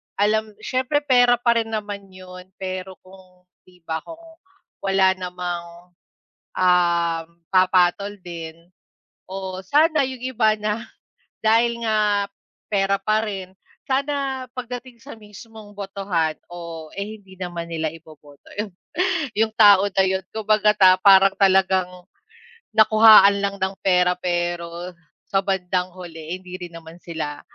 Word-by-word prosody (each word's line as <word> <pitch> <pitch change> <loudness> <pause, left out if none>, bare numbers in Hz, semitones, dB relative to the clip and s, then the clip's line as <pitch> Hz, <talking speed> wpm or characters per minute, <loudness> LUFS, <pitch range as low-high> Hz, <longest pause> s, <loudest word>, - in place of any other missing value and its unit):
alam 215 +1 0
siyempre, 260 +3 0
pera 245 -3 +4
pa 235 -1 +2
rin 225 0 -3
naman 205 -2 -5
'yon, 185 0 -12
pero 185 0 -6
kung 185 -1 -19 0.2
'di 180 -2 -22
ba 160 0 -2
kung 330 0 -11 0.6
wala 195 -1 +3
namang, 175 -1 -7 0.6
um, 170 -2 +2 0.3
papatol 185 +2 +2
din 170 -1 -9 0.6
o 190 -1 -5
sana 305 - +3
yung 255 -2 -8
iba 220 -4 +2
na 210 +2 -2 0.6
dahil 235 +2 +3
nga 210 -2 +2 0.5
pera 195 0 +2
pa 215 +2 +1
rin, 190 -3 -6 0.4
sana 275 -1 -1
pagdating 250 0 -7
sa 285 - -11
mismong 210 0 -13
botohan 195 -5 -2 0.2
o, 170 -2 -8
eh, 210 +2 -5
hindi 190 -1 -17
naman 175 -2 -5
nila 160 -1 -2
iboboto 155 -3 -17
'yon, 205 -3 -3 0.6
yung 220 0 +1
tao 205 -2 +7
na 190 0 +2
'yon. 190 0 -1
Kumbaga, 215 -1 +3 0.3
parang 195 -1 +6
talagang 190 -2 +3 0.9
nakuhaan 215 -2 +7
lang 200 0 -1
ng 190 +1 -1
pera, 180 -1 +3
pero 175 0 -3 0.4
sa 195 - +2
bandang 185 -2 -1
huli 165 -1 -7
hindi 185 0 -9
rin 175 -1 -8
naman 165 +1 -13
sila 155 -3 -5
190 Hz, 125 wpm, -22 LUFS, 180-215 Hz, 0.9 s, tao